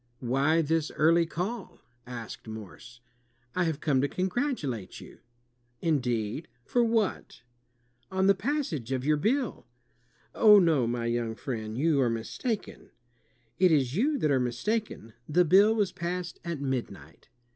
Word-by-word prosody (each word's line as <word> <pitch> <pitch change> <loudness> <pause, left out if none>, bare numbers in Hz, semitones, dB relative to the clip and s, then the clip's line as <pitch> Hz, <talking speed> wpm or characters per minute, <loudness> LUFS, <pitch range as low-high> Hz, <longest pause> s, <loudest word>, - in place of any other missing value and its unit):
"Why 140 +6 +2
this 160 0 0
eariy 165 +1 +3
call?" 195 +6 -4 0.3
asked 120 -2 -8
Morse. 110 +2 -10 0.5
"I 180 -1 +2
have 160 -3 -2
come 135 -4 +2
to 140 - +1
congratulate 180 - -2
you." - - -13 0.6
"Indeed, 125 -3 -1 0.2
for 245 - +2
what?" 225 - -1 0.7
I 190 - -6
"On 190 - +3
the 200 - +6
passage 190 - -2
of 130 0 -1
your 150 0 +3
bill," 245 - -1 0.7
"Oh, 210 -2 +7
no, 160 -10 +3
my 120 0 -2
young 115 -1 -1
friend, 110 -4 -5
you 150 0 +2
are 125 - +2
mistaken." 155 - -4 0.7
"It 185 -1 +5
is 135 -3 +2
you 285 - +2
that 155 - +1
are 135 - +3
mistaken. 125 - -2 0.2
The 175 +4 +4
bill 200 +6 +5
was 205 -4 +1
passed 180 -1 -4
at 170 -4 -4
midnight." 135 -3 -5
155 Hz, 145 wpm, -28 LUFS, 125-190 Hz, 0.7 s, Oh